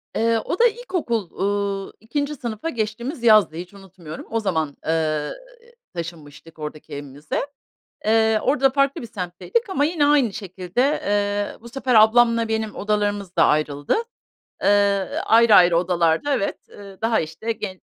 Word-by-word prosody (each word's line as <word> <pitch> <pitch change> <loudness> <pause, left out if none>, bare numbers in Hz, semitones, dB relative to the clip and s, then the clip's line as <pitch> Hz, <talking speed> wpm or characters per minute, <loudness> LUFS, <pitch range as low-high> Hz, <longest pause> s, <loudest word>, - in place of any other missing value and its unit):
Eee, 230 0 +2
o 360 - -3
da 480 - +6
ilkokul, 355 - -3
uuu, 200 0 -2
2'nci 285 +7 -3
sınıfa 235 +2 -4
geçtiğimiz 235 +3 -4
yazdı, 215 -8 +5
hiç 180 +3 -8
unutmuyorum. 185 -5 -11
O 225 - 0
zaman, 160 -8 -2
eee, 160 - 0
ııı, 155 -2 -1 0.6
taşınmıştık 165 -2 -9
oradaki 150 0 -7
evimize. 145 - -5 0.6
Eee, 220 0 +3
orada 270 0 +3
farklı 275 -1 +1
bir - - -6
semtteydik 220 - -3
ama 290 -6 +1
yine 305 -2 +1
aynı 280 -7 +3
şekilde, 190 +1 -4
eee, 205 -7 -1
bu 235 - -11
sefer 255 0 -1
ablamla 230 +1 +5
benim 220 -1 -2
odalarımız 205 -2 -2
da - - +5
ayrıldı. 145 -1 +1 0.7
Eee, - - +2 0.6
ayrı 225 -1 +6
ayrı 175 -2 +6
odalarda, 175 - +1
evet, 200 - -1
eee, 200 -1 -12
daha 225 0 +2
işte 165 +9 -4
gen 195 -4 -6
210 Hz, 145 wpm, -22 LUFS, 175-235 Hz, 0.7 s, da